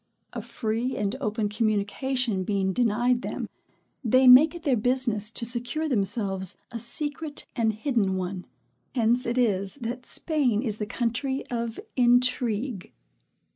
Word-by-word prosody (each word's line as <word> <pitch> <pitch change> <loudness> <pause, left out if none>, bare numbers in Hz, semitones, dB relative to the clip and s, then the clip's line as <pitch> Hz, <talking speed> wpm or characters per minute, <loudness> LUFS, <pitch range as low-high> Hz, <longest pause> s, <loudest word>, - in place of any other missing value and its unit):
A - - -4
free 230 +3 -3
and 205 +2 -1
open 215 -3 -1
communication 215 +1 -1
being 190 -1 0
denied 240 +2 +1
them, - - -4 0.6
they 255 +2 +4
make 285 +7 +8
it 340 - -9
their 280 -6 +2
business 235 -2 +1
to 235 - 0
secure 245 +7 -1
themselves 195 - +1
a 235 - -5
secret 295 +5 -4
and 230 -3 +2
hidden 220 -4 0
one. 185 0 -4 0.5
Hence 240 +1 +1
it 240 +2 -1
is 200 -5 +1
that 250 -1 -6
Spain 265 -9 0
is 215 -5 -2
the 210 - -4
country 250 +4 -2
of 235 -1 -3 0.2
intrigue. 245 -3 +1
235 Hz, 135 wpm, -26 LUFS, 210-255 Hz, 0.6 s, make